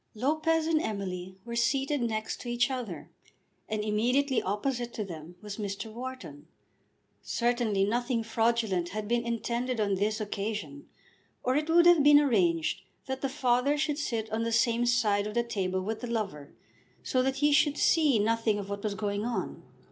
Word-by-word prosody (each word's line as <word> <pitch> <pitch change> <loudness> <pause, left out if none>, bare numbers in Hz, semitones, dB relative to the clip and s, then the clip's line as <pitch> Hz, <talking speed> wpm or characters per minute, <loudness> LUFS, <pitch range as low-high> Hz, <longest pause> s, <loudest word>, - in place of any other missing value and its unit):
Lopez 315 +6 +1
and 320 -1 +2
Emily 190 - -4
were 235 0 -5
seated 270 +4 +1
next 220 -2 -2
to 245 - -6
each 240 +2 +1
other, 250 -4 -5 0.6
and 215 -1 -1
immediately 250 +5 +1
opposite 240 +4 -2
to 215 - -3
them 165 -1 -9
was 205 -1 -6
Mr. 210 +1 -5
Wharton. 240 - -8 0.7
Certainly 235 -4 0
nothing 240 +2 0
fraudulent 225 -5 0
had 210 +2 -4
been 235 +1 +1
intended 235 +1 -2
on 205 -2 +1
this 205 +3 0
occasion, 215 +6 -4 0.5
or 255 +1 +1
it 305 +2 0
would 340 +1 +6
have 350 -3 +7
been 290 0 +7
arranged 185 - +1 0.2
that 265 0 -4
the 275 - -1
father 260 +1 +1
should 300 0 -1
sit 230 -6 -2
on 220 +1 -1
the 230 0 -1
same 235 +1 +2
side 210 -4 +2
of 210 - -6
the 235 - +2
table 190 -5 -2
with 220 +3 -4
the 245 - -4
lover, 195 -11 -4 0.5
so 255 - +1
that 265 +1 0
he 295 +1 +2
should 295 0 +3
see 305 -7 +4
nothing 225 0 +1
of 200 -1 -6
what 200 0 -4
was 210 -2 -2
going 205 +1 -2
on. 240 +1 -3
230 Hz, 175 wpm, -29 LUFS, 205-260 Hz, 0.7 s, have